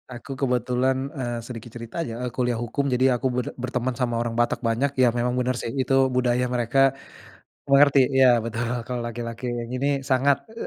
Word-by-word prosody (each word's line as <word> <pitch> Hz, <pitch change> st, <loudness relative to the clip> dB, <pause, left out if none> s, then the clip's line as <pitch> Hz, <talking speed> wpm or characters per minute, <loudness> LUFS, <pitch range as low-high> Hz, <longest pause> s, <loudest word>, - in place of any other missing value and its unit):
Aku 130 Hz, +3 st, -10 dB
kebetulan 130 Hz, +1 st, 0 dB
eee, 120 Hz, -2 st, -3 dB
sedikit 115 Hz, -1 st, -9 dB
cerita 115 Hz, +6 st, -7 dB
aja, 120 Hz, -9 st, -3 dB
eee, 125 Hz, -, -3 dB
kuliah 125 Hz, -1 st, 0 dB
hukum 140 Hz, +4 st, -2 dB
jadi 125 Hz, -1 st, +2 dB
aku 130 Hz, -, 0 dB
ber 125 Hz, -1 st, -1 dB
berteman 125 Hz, 0 st, -2 dB
sama 120 Hz, -2 st, 0 dB
orang 115 Hz, 0 st, -2 dB
Batak 120 Hz, +1 st, 0 dB
banyak, 115 Hz, +5 st, +1 dB
ya 125 Hz, -2 st, +5 dB
memang 120 Hz, +1 st, -1 dB
benar 125 Hz, 0 st, 0 dB
sih 115 Hz, -, -4 dB
itu 135 Hz, -, -1 dB, 0.2 s
budaya 125 Hz, 0 st, +2 dB
mereka, 125 Hz, +1 st, 0 dB, 0.9 s
mengerti. 140 Hz, 0 st, +6 dB, 0.2 s
Iya 135 Hz, 0 st, +6 dB, 0.2 s
betul, 115 Hz, +1 st, -3 dB, 0.2 s
kalau 125 Hz, -1 st, -3 dB
laki-laki 120 Hz, +1 st, -5 dB, 0.3 s
ini 130 Hz, +2 st, -1 dB, 0.2 s
sangat, 135 Hz, +2 st, +4 dB
e 225 Hz, +1 st, -6 dB
125 Hz, 180 wpm, -24 LUFS, 120-130 Hz, 0.9 s, mengerti